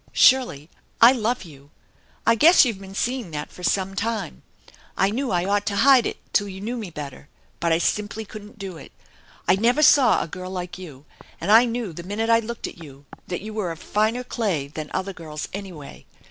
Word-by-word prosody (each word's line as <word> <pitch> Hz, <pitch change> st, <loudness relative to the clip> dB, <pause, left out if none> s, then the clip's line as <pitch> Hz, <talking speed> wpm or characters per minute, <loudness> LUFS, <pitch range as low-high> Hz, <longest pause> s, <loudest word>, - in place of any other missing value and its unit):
" -, -, -27 dB, 0.2 s
Shirley, 245 Hz, -, +2 dB, 0.3 s
I 235 Hz, +2 st, +9 dB
love 240 Hz, -2 st, -1 dB
you. 145 Hz, -5 st, -15 dB, 0.6 s
I 230 Hz, -, +5 dB
guess 310 Hz, +8 st, +7 dB
you've 225 Hz, -6 st, -2 dB
been 195 Hz, 0 st, -11 dB
seeing 245 Hz, -2 st, -2 dB
that 150 Hz, -2 st, -6 dB
for -, -, -13 dB
some 190 Hz, +1 st, 0 dB
time. 215 Hz, -5 st, -3 dB, 0.6 s
I 195 Hz, +1 st, +3 dB
knew 260 Hz, +4 st, -2 dB
I 175 Hz, -1 st, 0 dB
ought 205 Hz, +1 st, 0 dB
to 205 Hz, -, -1 dB
hide 265 Hz, -4 st, +6 dB
it -, -, -5 dB, 0.2 s
till 205 Hz, -, +2 dB
you 190 Hz, -1 st, -8 dB
knew 225 Hz, +5 st, -4 dB
me 220 Hz, -6 st, -5 dB
better, 145 Hz, -3 st, -9 dB, 0.3 s
but 170 Hz, -, 0 dB
I 165 Hz, -, +4 dB
simply 210 Hz, +5 st, -2 dB
couldn't 210 Hz, +2 st, -11 dB
do 195 Hz, -4 st, -7 dB
it. 140 Hz, -, -12 dB, 0.6 s
I -, -, +5 dB
never 245 Hz, +8 st, +3 dB
saw 280 Hz, -4 st, +6 dB
a -, -, -7 dB
girl 185 Hz, +3 st, -7 dB
like 180 Hz, -1 st, -6 dB
you, 150 Hz, -6 st, -11 dB, 0.3 s
and 180 Hz, +5 st, -1 dB
I 230 Hz, +3 st, +8 dB
knew 230 Hz, -6 st, -3 dB
the 170 Hz, -, -7 dB
minute 210 Hz, +5 st, -2 dB
I 230 Hz, -, +6 dB
looked 235 Hz, +1 st, -6 dB
at 170 Hz, -, -8 dB
you 140 Hz, -1 st, -14 dB, 0.2 s
that 175 Hz, -, -4 dB
you 215 Hz, +2 st, -7 dB
were 205 Hz, -5 st, -2 dB
of 165 Hz, -, -7 dB
finer 220 Hz, +8 st, 0 dB
clay 200 Hz, -, -2 dB
than 150 Hz, +1 st, -7 dB
other 195 Hz, +1 st, -3 dB
girls, 155 Hz, -4 st, -7 dB
anyway. 185 Hz, -8 st, -9 dB
200 Hz, 215 wpm, -23 LUFS, 170-230 Hz, 0.6 s, I